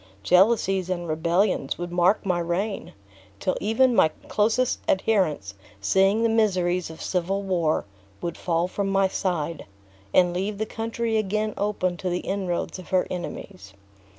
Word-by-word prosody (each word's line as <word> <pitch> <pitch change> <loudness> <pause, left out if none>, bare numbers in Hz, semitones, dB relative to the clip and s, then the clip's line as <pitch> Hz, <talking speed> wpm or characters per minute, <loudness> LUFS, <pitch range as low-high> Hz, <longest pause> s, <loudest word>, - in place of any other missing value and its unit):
Jealousies 190 - +3
and 175 -2 -2
rebellions 170 0 +1
would 175 0 -5
mark 180 +4 +2
my 180 -2 +1
reign; 185 +5 -2 0.5
till 185 - 0
even 240 +4 +3
my - - +6 0.2
closest 225 +4 +1
adherents, 185 - +1 0.3
seeing 195 - +3
the - - +4
miseries 185 -6 +1
of 160 - -10
civil 190 +2 -1
war, 175 -5 0 0.3
would 170 -1 -4
fall 170 0 0
from 200 +2 -2
my 195 0 +3
side, 170 -5 -2 0.5
and 180 -1 +4
leave 195 +3 -2
the 220 - -1
country 225 0 -2
again 215 +1 -1
open 190 -4 -1
to 185 - -3
the 175 0 -1
inroads 190 -2 -3
of 185 - -11
her 185 -1 +2
enemies. 180 - -7
185 Hz, 150 wpm, -25 LUFS, 175-210 Hz, 0.5 s, my